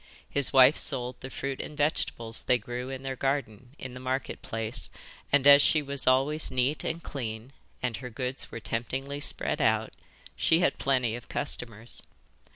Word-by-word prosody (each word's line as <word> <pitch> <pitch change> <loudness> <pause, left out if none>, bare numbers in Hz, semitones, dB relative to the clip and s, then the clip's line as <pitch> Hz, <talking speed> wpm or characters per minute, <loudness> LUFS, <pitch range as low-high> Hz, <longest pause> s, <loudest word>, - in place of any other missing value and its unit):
His 140 -2 +2
wife 130 +3 +6
sold 125 0 +1
the 130 - -8
fruit 135 0 -4
and 150 - -9
vegetables 120 -6 -1
they 125 - +2
grew 125 +1 -6
in 135 0 -6
their 135 0 -3
garden 130 -2 -3
in 130 -1 -8
the 125 - -8
Market 130 +1 -3
Place, 115 +1 -4 0.4
and 145 -1 +4
as 145 0 +9
she 155 +1 +3
was 140 -1 0
always 135 +4 +3
neat 130 +4 0
and 165 +1 -3
clean 115 -1 -6 0.3
and 120 -4 -1
her 125 0 -7
goods 125 +2 -3
were - - -6
temptingly 130 +6 -3
spread - - +2
out - - +1 0.4
she 160 - +3
had - - +1
plenty 125 -4 +1
of 120 - -10
customers. 115 -1 -2
130 Hz, 170 wpm, -28 LUFS, 120-140 Hz, 0.4 s, as